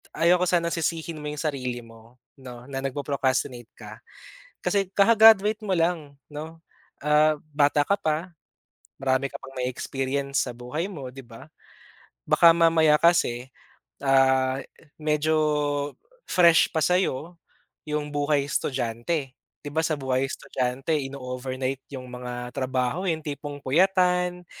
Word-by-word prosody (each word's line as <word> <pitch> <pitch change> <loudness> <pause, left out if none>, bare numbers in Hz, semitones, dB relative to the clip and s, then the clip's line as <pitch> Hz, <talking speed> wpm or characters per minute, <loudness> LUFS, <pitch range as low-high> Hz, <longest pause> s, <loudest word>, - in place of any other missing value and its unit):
ayaw 175 +2 +3
ko - - +3
sanang 170 -1 +1
sisihin 165 -1 -2
mo 150 - -5
yung 150 -1 -5
sarili 125 -5 -3
mo, 115 +1 -17 0.2
'no, 125 -2 -10
na, 135 -1 -4
nagpo-procrastinate 135 -3 -2
ka. - - -11 0.6
Kasi 200 -2 0
kaka-graduate 215 0 +6
mo 190 - +1
lang, 165 -4 -1 0.2
'no, 160 +2 -8 0.4
ah, 150 +1 +4
bata 145 0 +3
ka 200 - +1
pa, 160 0 -2 0.7
marami 135 0 +1
ka - - -5
pang 135 - -11
mae-experience 135 +2 -2
sa 125 - -5
buhay 125 +8 -4
mo, 145 -10 -7
'di 135 +1 -11
ba? 115 +6 -13 0.8
Baka 170 - +6
mamaya 165 -2 +5
kasi, 130 -7 +2 0.5
ah, 130 0 +3
e - - -12 0.4
medyo 155 +1 +1 0.9
fresh 170 -2 +5
pa 160 - +1
sa'yo, 175 -1 0 0.5
yung 150 0 -2
buhay-estudyante. 140 -1 -1 0.3
'Di 145 - -5
ba, 160 - +2
sa 155 - 0
buhay 130 -1 0
estudyante, 130 +6 -3 0.2
ino-overnight 130 0 -4
yung 130 -1 -6
mga 125 0 -7
trabaho, 130 +4 -1
eh, 170 - +2
yung 155 - -14
tipong 145 -1 -5
puyatan, 180 +3 +2
145 Hz, 130 wpm, -25 LUFS, 130-165 Hz, 0.9 s, kaka-graduate